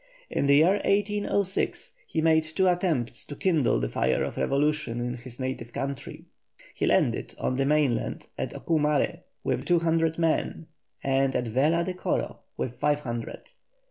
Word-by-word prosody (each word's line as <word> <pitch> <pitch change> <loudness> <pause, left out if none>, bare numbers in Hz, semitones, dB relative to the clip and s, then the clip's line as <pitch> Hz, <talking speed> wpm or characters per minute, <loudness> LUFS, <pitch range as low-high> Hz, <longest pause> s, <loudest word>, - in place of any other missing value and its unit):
In 140 - +1
the 140 - +6
year 175 +7 +5
1806 200 -1 0 0.2
he 160 - -1
made 160 -1 +4
two 160 +4 0
attempts 160 -10 0
to 145 - -7
kindle 160 -6 +2
the - - -1
fire 65 +2 +1
of - - -4
revolution 145 -3 0
in 120 0 -2
his 120 0 -10
native 130 -3 -4
country. 140 0 -5 0.5
He - - -1
landed - - +1
on 130 - -1
the 135 - +2
mainland 145 -5 +1
at - - -3
Ocumare 150 -3 +1 0.2
with - - -1
two 175 - +4
hundred 165 -1 +1
men, 165 0 0 0.4
and 135 0 +2
at 125 - 0
Vela 150 +9 +2
de 185 +1 -3
Coro 180 - -2 0.2
with 125 0 -4
five 150 0 +2
hundred. 120 -4 -5
150 Hz, 160 wpm, -27 LUFS, 130-165 Hz, 0.5 s, the